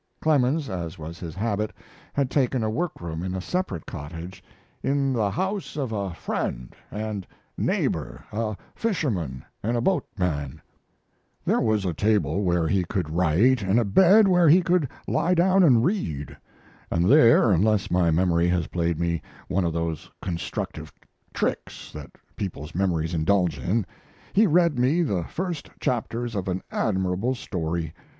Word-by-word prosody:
Clemens, 145 -1 +2
as 90 -3 -5
was 80 +2 -8
his 80 -3 -7
habit, 105 0 -1 0.4
had 140 -2 0
taken 130 -4 +1
a 110 - 0
work 170 +8 -2
room 80 -1 -4
in 95 +1 -3
a - - -2
separate 95 - -3
cottage 85 +5 -8 0.4
"in 135 -1 +1
the 110 -4 +1
house 190 - -3
of 135 -5 -2
a 100 -3 -2
friend 65 -6 -4
and 105 -2 -4 0.3
neighbor, 65 -6 -1
a 110 -1 -2 0.2
fisherman 105 - -2 0.2
and 120 +3 0
a - - 0
boatman": 90 - -1 0.9
There - - +2
was 110 -3 +1
a 90 - 0
table 100 -3 +1
where 85 -4 +1
he 90 +3 +2
could 90 -3 -3
write, 90 +10 +3
and 100 +4 +2
a 120 - +1
bed 190 - +6
where 175 -3 +5
he 180 +4 +6
could 170 -5 +2 0.2
lie 180 - +2
down 185 +3 +4
and 125 -9 +5
read; 75 - -2 0.5
and 85 +1 +1
there, 115 -2 +6
unless 105 +3 +2
my 90 -1 +3
memory 85 +1 +2
has 90 -2 +1
played 85 -1 -1
me 85 -1 0 0.3
one 95 0 +1
of 85 - 0
those 85 -2 -3
constructive 85 -3 -4 0.4
tricks - - -3
that 75 -1 -8 0.3
people's 80 -6 -5
memories 85 -3 0
indulge 85 -2 +1
in, 95 - 0 0.5
he 215 +2 +5
read 170 -4 +3
me 145 +8 +3
the 95 - -1
first 175 -4 -4
chapters 120 -1 -2
of 95 -2 -3
an 95 0 -2
admirable 95 +4 0
story. 85 -7 -3
100 Hz, 155 wpm, -25 LUFS, 85-130 Hz, 0.9 s, bed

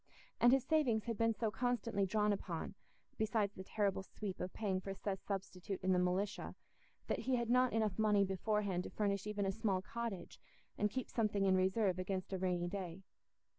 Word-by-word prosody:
And 240 - +7
his 270 -1 +4
savings 260 -7 +2
had 230 -1 -2
been 225 +1 +2
so 220 -1 0
constantly 230 -4 0
drawn 210 +1 +2
upon 175 -3 -4 0.5
(besides 215 -2 +1
the 190 - -8
terrible 200 -1 0
sweep 190 0 -6
of 180 - -3
paying 190 -3 -1
for 195 0 -5
Seth's 195 -1 -4
substitute 195 -1 -3
in 190 - +3
the 180 - +3
militia) 185 +3 -1 0.5
that - - -1
he 260 - +1
had 235 -1 0
not 250 0 +5
enough 220 -3 0
money 210 -2 +4
beforehand 195 -1 0
to - - -5
furnish 200 -1 -1
even 210 -1 -1
a 195 - +2
small 195 -3 0
cottage, 230 -3 -5 0.4
and 210 - +1
keep 260 +4 -3
something 210 -3 +1
in 190 -1 +5
reserve 185 0 +2
against 190 +1 -3
a 190 - -1
rainy 180 -1 0
day. 185 -1 -5
200 Hz, 190 wpm, -37 LUFS, 190-220 Hz, 0.5 s, And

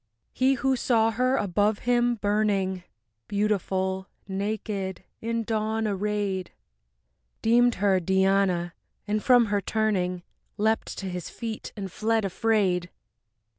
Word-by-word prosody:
He 265 +1 +3
who 265 +1 +1
saw 225 -2 +2
her 255 +4 +1
above 205 +2 +1
him 240 0 +3
burning, 205 -3 0 0.5
Beautiful, 190 -2 -1 0.2
naked, 195 -1 -3 0.2
in 230 0 -1
dawn 220 0 -1
arrayed, 200 -2 -1 0.9
Deemed 240 +1 +4
her 195 -1 +2
Diana, 190 -1 +2 0.3
and 210 0 0
from 245 -2 +6
her 205 - +2
turning, 185 -4 0 0.3
Leapt 220 +1 0
to 195 - -5
his 180 -2 -5
feet 225 -2 -6
and 195 -2 -5
fled 220 +2 0
afraid. 190 -3 +1
205 Hz, 115 wpm, -26 LUFS, 190-225 Hz, 0.9 s, from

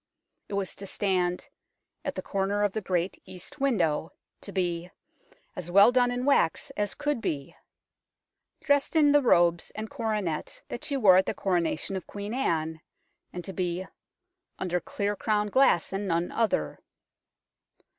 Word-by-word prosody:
It 200 - -3
was 195 -2 -2
to 195 - -7
stand 180 -3 0 0.3
" - - -47
at - - -2
the - - -4
corner 200 +1 0
of 205 -2 +1
the 220 - -2
great 180 -1 -1
east 190 - -9
window," 175 - +1 0.3
to 200 - -8
be 175 -2 -1 0.4
" - - -32
as 175 -1 -6
well 200 +6 +7
done 245 -1 +3
in 245 +1 -2
wax 275 - +2
as 205 0 -1
could 290 -4 -1
be," 140 -8 -3 1.1
dressed 285 +1 +1
in 295 -2 +6
the 290 0 +5
robes 175 -8 +3
and 215 +1 -5
coronet 215 - -2
that 240 - -6
she 285 -3 -1
wore 195 -7 +7
at 190 - +3
the - - -1
Coronation 175 0 0
of 190 - -5
Queen 205 +2 -6
Anne, 160 -10 -1 0.5
and 180 -1 -7
to 190 - -6
be 180 0 -2 0.4
" 365 0 -54
under 180 -1 -1
clear 205 +4 -2
crown 210 0 0
glass 230 -7 +3
and 200 +1 -2
none 170 0 0
other." 210 - 0
195 Hz, 165 wpm, -28 LUFS, 175-235 Hz, 1.1 s, well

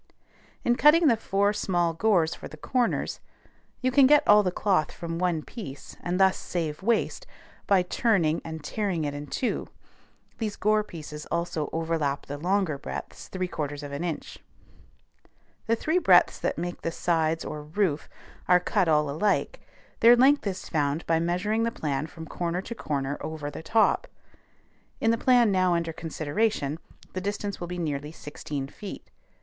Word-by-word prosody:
In 240 0 +2
cutting 305 +4 +6
the 235 - +5
four 200 -1 +1
small 175 -5 0
gores 170 -2 +2
for - - -8
the - - -12
corners, 250 -3 -1 0.6
you 255 0 +1
can 265 0 +6
get 295 +1 +5
all 210 0 +8
the 185 -3 0
cloth 185 -3 +1
from 165 0 -5
one 175 -4 0
piece, 145 - -9
and 175 +1 -2
thus 190 -1 +4
save 160 -4 -3
waste, 235 - 0 0.4
by 195 -3 +4
turning 180 -5 +1
and 160 -2 -7
tearing 185 0 -2
it 145 -1 -2
in 145 0 -6
two; 250 - -2 0.7
these 215 -3 -2
gore 215 +1 +2
pieces 150 -5 -9
also 170 -3 -2
overlap 160 -4 -1
the 145 +1 -6
longer 180 -3 0
breadths - - -7
3/4 155 -6 -3
of 145 - -7
an 140 +4 -4
inch. 170 -4 -5 1.3
The 230 - +3
three 315 +9 +1
breadths - - +5
that - - -1
make 175 +1 -4
the 165 - -2
sides 165 -1 0
or 150 - -5
roof 155 0 -1 0.4
are 180 0 +6
cut 185 +1 +1
all 150 -1 +3
alike; 205 - 0 0.4
their 235 +1 +8
length 265 0 +4
is 190 -1 -4
found 150 0 -1
by 165 0 +2
measuring 180 +6 0
the 230 0 +1
plan 150 - -2
from 165 -1 -10
corner 175 +3 -3
to 235 - -6
corner 140 -8 -3
over 155 -2 -5
the - - -7
top; 220 +6 +2 0.9
in 225 - +3
the 230 - +2
plan 245 -4 +4
now 185 -2 +3
under 165 -1 -1
consideration, 160 0 -1 0.3
the 185 - -3
distance 205 0 -3
will 175 - -5
be 180 +1 -5
nearly 150 -3 -3
sixteen 150 -3 -6
feet. 200 +7 -9
175 Hz, 165 wpm, -27 LUFS, 155-210 Hz, 1.3 s, all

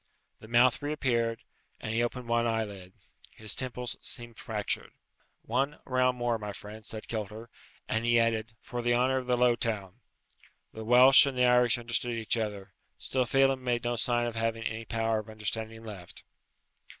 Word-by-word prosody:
The 110 - -13
mouth 120 +2 +4
reappeared, 125 -6 -1 0.4
and 110 - -4
he 115 - +2
opened 120 +1 -3
one 120 0 +2
eyelid. 100 -5 -3 0.4
His 110 -1 -3
temples 125 -1 -3
seemed 120 -1 -4
fractured. 105 -2 -3 0.5
"One 135 +6 -1
round 130 -1 +1
more, 120 -2 0
my 105 -1 -5
friend," 105 +2 -9
said 110 +1 -6
Kilter; 110 +1 -5 0.4
and 110 +1 0
he 120 0 +4
added, 115 -1 0
"for 120 - -5
the 120 0 +2
honour 130 +2 +2
of 125 - -8
the 125 -1 +2
low 120 -1 +4
town." 105 -5 -3 0.7
The 110 - -7
Welsh 130 +5 +8
and 135 -2 -3
the 125 - +4
Irish 125 -1 +4
understand 120 0 -1
each 110 0 0
other, 105 -4 -4 0.2
still 130 -1 -1
Phelem 135 0 +3
made 120 -2 0
no 120 0 0
sign 120 0 0
of 120 - -3
having 115 0 -2
any 115 0 -4
power 115 -1 0
of 110 - -9
understanding 110 +1 -4
left. 100 -6 -10
115 Hz, 175 wpm, -29 LUFS, 110-125 Hz, 0.7 s, Welsh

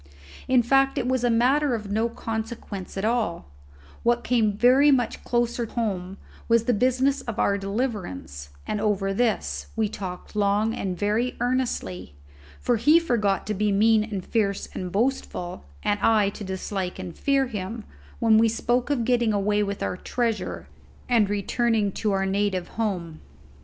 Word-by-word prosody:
In 255 -2 +4
fact, 270 +3 +3
it 245 - 0
was 255 -1 0
a 245 - +3
matter 255 +4 +3
of 210 -3 -6
no 220 +3 +1
consequence 220 -4 -5
at 195 - -1
all; 220 -7 0 0.6
what 240 0 +2
came 220 -5 +1
very 260 +5 +5
much 250 -5 +1
closer 240 -1 0
home 195 -5 -3 0.3
was 230 -1 +4
the 245 +1 +2
business 260 +5 +2
of 235 -2 -6
our 200 - +2
deliverance, 195 - -4 0.2
and 210 - -2
over 195 -2 0
this 225 +1 -1
we 220 -1 +1
talked 185 -1 -7
long 210 +2 +2
and 185 -5 -3
very 215 +5 0
earnestly, 235 - -2 0.4
for 245 - +1
he 305 +9 +5
forgot 220 -11 0
to 215 - -2
be 210 +1 +1
mean 215 +2 +4
and 205 -4 -5
fierce 200 -4 0
and 180 -1 -5
boastful, 200 - -2 0.2
and 205 0 +1
I 210 -2 +3
to 205 - -8
dislike 190 -1 -4
and 185 -3 -7
fear 275 -1 +2
him, 220 -1 -5 0.3
when 220 -2 +4
we 225 0 +4
spoke 240 +3 0
of 255 -6 0
getting 240 -3 +2
away 205 +1 +1
with 200 -1 -2
our 180 - -2
treasure, 225 -2 -2 0.4
and 230 -5 +3
returning 210 +1 +1
to 210 +2 -1
our 195 0 +1
native 195 -2 -1
home. 180 -8 -3
220 Hz, 165 wpm, -25 LUFS, 195-240 Hz, 0.6 s, very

